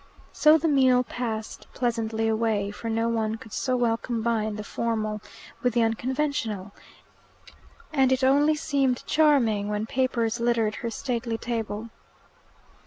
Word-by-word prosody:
So 305 +1 +6
the 325 +1 0
meal 260 -4 +4
passed 225 -3 -5
pleasantly 225 -2 -1
away, 220 -2 0
for 230 +2 -6
no 225 +1 0
one 220 -1 0
could 225 -1 -12
so 255 -1 0
well 235 -2 +2
combine 225 -3 -1
the 210 - -5
formal 215 -1 -2 0.4
with 245 -2 0
the 235 - +4
unconventional, 225 -4 -1 1.2
and 265 -3 +3
it 260 0 +1
only 290 +4 +4
seemed 275 -4 0
charming 250 -10 +3
when 210 +1 -1
papers 240 -2 0
littered 235 -2 +1
her 235 - -3
stately 235 -1 -3
table. 225 -1 -4
230 Hz, 135 wpm, -26 LUFS, 220-255 Hz, 1.2 s, So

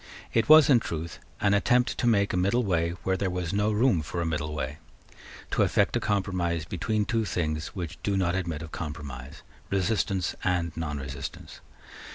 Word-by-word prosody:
It 115 - +2
was, 155 -1 +9
in 130 -5 +6
truth, 80 -6 -5 0.2
an 100 -1 +3
attempt 125 +5 +3
to 120 - +1
make 100 -4 +3
a - - +1
middle 100 +7 +2
way 85 -4 0
where 95 - +1
there 95 0 -1
was 90 -1 -3
no 105 +1 +2
room 105 -5 +3
for 80 +3 -5
a 85 - 0
middle 75 -1 -2
way, 75 0 -4 0.7
to - - +1
effect - - +2
a - - +2
compromise 90 -5 -1
between 110 +3 -1
two 115 0 0
things 80 -4 -2
which 85 -4 -6
do 100 -1 0
not 90 -2 +1
admit 85 -4 -2
of 80 - -9
compromise, 75 -3 -7 0.3
resistance 95 -2 0
and 85 -3 0
nonresistance. 70 -4 -6
90 Hz, 180 wpm, -27 LUFS, 80-100 Hz, 0.7 s, was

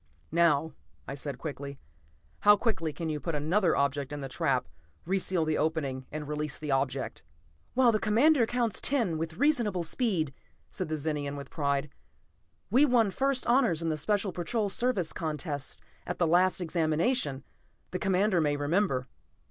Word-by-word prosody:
"Now," 160 -2 +3 0.3
I - - -4
said, 140 -1 -5 1.0
"how 210 0 +6
quickly 190 -9 -1
can 165 +2 -4
you 150 -1 -2
put 165 +1 -3
another 165 +5 +2
object 140 0 0
in 145 - -4
the 135 - -4
trap, 130 - 0 0.4
re 190 +3 +1
seal 180 -3 0
the 155 -1 0
opening, 145 -5 -1
and 150 -1 -5
release 150 0 -2
the 150 -2 -4
object?" 135 -1 -1 0.5
"While 250 -2 +5
the 215 - +1
Commander 235 +4 +4
counts 240 -2 0
ten 225 - +2
with 160 0 -4
reasonable 235 - +2
speed," 165 - 0 0.4
said - - -4
the 155 - -1
Zenian 145 -1 -2
with 140 -2 -9
pride. 140 -1 -1 0.8
"We 260 +6 +5
won 240 -7 +4
first 270 +4 0
honors 235 - +3
in 165 - 0
the 155 - 0
Special 200 +5 0
Patrol 200 +5 -1
Service 200 -6 0
contests 150 -3 -3 0.3
at 175 - -3
the 175 - +2
last 180 +3 +3
Examination, 160 - 0 0.5
the 180 - -3
Commander 190 -1 +2
may 145 -1 +1
remember." 145 -3 0
165 Hz, 160 wpm, -29 LUFS, 150-210 Hz, 1.0 s, how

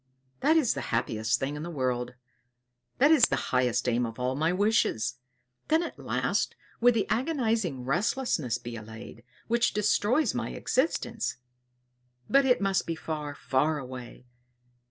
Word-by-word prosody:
"That 315 +2 +4
is 285 -8 +3
the - - -4
happiest 115 +1 0
thing 135 +2 -2
in 150 - -5
the 170 - -5
world! 125 -5 -2 0.8
That 285 +4 +5
is 320 - +7
the - - 0 0.2
highest 125 -1 +2
aim 120 0 +2
of 115 - -8
all 125 +1 -1
my 160 +4 +1
wishes! 180 - +1 0.5
Then 320 +2 +3
at - - -7
last - - -1 0.2
would 245 0 +5
the 215 -4 +1
agonizing 225 - 0
restlessness 155 - 0
be 120 -1 -8
allayed, 110 +1 -10 0.2
which 235 +1 +2
destroys 210 +7 +2
my - - -3
existence! 230 - -1 0.9
But 275 0 +4
it 250 - +3
must 195 -1 +1
be 165 - -1
far, 150 -2 -5
far 150 +4 +1
away! 125 -2 -9
155 Hz, 150 wpm, -28 LUFS, -, 0.9 s, is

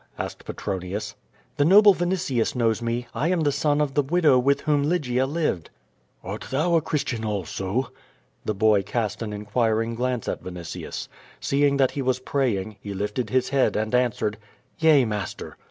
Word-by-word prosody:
asked - - -6
Petronius. 95 +1 -4 0.4
"The 145 - +4
noble 200 +5 +7
Vinitius 175 -11 -1
knows 115 -2 +1
jne, 120 +1 -2
I 150 - 0
am 180 -1 +1
the 145 -2 +2
son 145 +1 +1
of 145 -2 0
the 145 - +3
widow 150 -2 +3
with 140 +3 +2
whom 150 -2 +2
Lygia 135 -5 +1
lived." 145 - -1 0.5
"Art - - -6
thou 155 +6 +1
a 165 - +4
Christian 140 -7 -2
also?" 100 +3 -2 0.5
The 110 - -2
boy 105 0 +4
cast 105 +1 -2
an 110 -2 -3
inquiring 110 +2 0
glance 125 0 -2
at - - -3
Vinitius. 90 -3 -6 0.3
Seeing 140 0 +2
that 135 -2 +3
he 140 - -3
was 130 -1 +1
praying 115 -7 -1
he 100 -1 -6
lifted 105 +4 -2
his 130 +2 +1
head 135 -1 +2
and 110 +1 -1
answered: 115 -4 +1 0.4
^*Yea, 155 -5 +5
master." 105 -4 -5
125 Hz, 170 wpm, -24 LUFS, 105-145 Hz, 0.5 s, noble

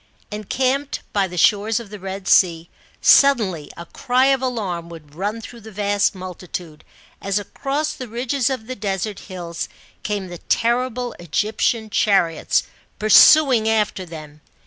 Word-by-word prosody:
Encamped 260 +7 -1
by 200 -2 +1
the 180 0 -9
shores 210 +5 +3
of 220 -4 -11
the 210 - -8
Red 190 0 -6
Sea, 170 -2 +3 0.3
suddenly 215 - +4
a 170 - -8
cry 255 +7 +1
of 265 - -1
alarm 195 -10 -3
would 155 -4 -12
run 205 +7 -3
through 235 +1 -11
the 220 +1 -11
vast 205 0 0
multitude, 180 -3 -8 0.4
as 195 0 -1
across 280 +8 -3
the 255 -4 -8
ridges 245 +3 -1
of 255 -5 -4
the 255 +2 -6
desert 200 -1 -3
hills 175 -3 -6 0.3
came 205 -2 -3
the 175 -1 -9
terrible 245 +1 0
Egyptian 215 +6 -1
chariots 175 -7 +2 0.3
pur 215 - -3
suing 260 -3 +7
after 210 -3 0
them. 155 -3 -11
210 Hz, 145 wpm, -21 LUFS, 180-240 Hz, 0.4 s, suing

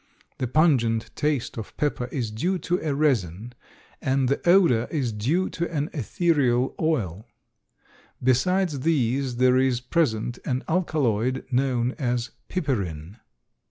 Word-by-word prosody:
The 130 - -1
pungent 120 -6 +2
taste 145 -6 -1
of 110 - -9
pepper 145 -4 -1
is 125 -4 -3
due 175 - -1
to 180 +1 -1
a 150 -3 -1
resin 120 - 0 0.5
and 130 -1 +1
the 140 - 0
odor 170 -11 +5
is 135 -7 -1
due 145 - 0
to 170 0 -3
an 150 -2 -2
ethereal 135 - +1
oil. 110 - -1 1.0
Besides 155 +5 +2
these 130 -3 0
there 125 +1 +4
is 130 -2 +2
present 120 -4 -1
an 130 -1 -2
alkaloid 135 - 0
known 125 -1 +1
as 120 -3 -1 0.2
piperin. 100 - -3
130 Hz, 125 wpm, -25 LUFS, 120-155 Hz, 1.0 s, odor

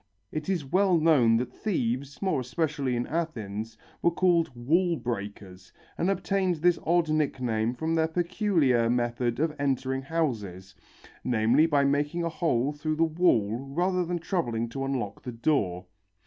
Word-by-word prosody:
It 155 +3 -4
is 175 -7 -1
well 185 +4 +3
known 140 -8 +4
that 125 +2 -3
thieves, 140 - -2
more 190 -8 +1
especially 140 0 -1
in 120 0 -1
Athens, 110 -9 -4 0.2
were - - +4
called 170 -1 +2
"wall 165 +9 +2
breakers," 100 -6 -6 0.2
and 175 - 0
obtained 190 -1 0
this 170 +2 +2
odd 170 0 +3
nickname 125 -6 0
from 160 +5 -2
their 160 -1 +2
peculiar 165 - +1
method 120 0 0
of 155 0 +1
entering 135 -1 -1
houses, 110 - -3 0.5
namely, 125 +6 +3
by 145 -3 +3
making 145 +4 0
a 170 - 0
hole 145 -6 0
through 155 +1 -2
the 165 - +2
wall 155 - +2
rather 175 +7 0
than 175 +1 -2
troubling 160 -10 -2
to 135 +3 -4
unlock 120 -7 -3
the 125 - -6
door. 115 - 0
140 Hz, 150 wpm, -27 LUFS, 120-165 Hz, 0.5 s, known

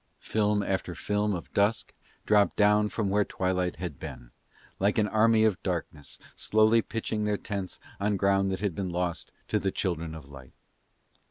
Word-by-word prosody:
Film 105 -1 0
after 95 -2 -2
film 105 +3 0
of 85 - -8
dusk 105 +2 +1 0.3
dropped 105 -1 +4
down 105 0 +4
from 105 -3 -1
where 105 +1 +3
twilight 90 -2 -1
had 85 -7 -6
been, - - -9 0.5
like 100 +2 +2
an 105 -1 +3
army 110 +1 +4
of 110 -5 +2
darkness 80 -6 -4 0.2
slowly 110 +2 +3
pitching 110 -1 -3
their 105 -1 +1
tents 100 -3 -5 0.2
on 100 0 +1
ground 95 0 +2
that 95 - -3
had 100 -4 0
been 95 +2 -3
lost 90 -1 -3 0.2
to - - +1
the 95 - 0
children 85 -4 -2
of 75 -3 -10
light. 65 -2 -12
100 Hz, 170 wpm, -28 LUFS, 90-105 Hz, 0.5 s, dropped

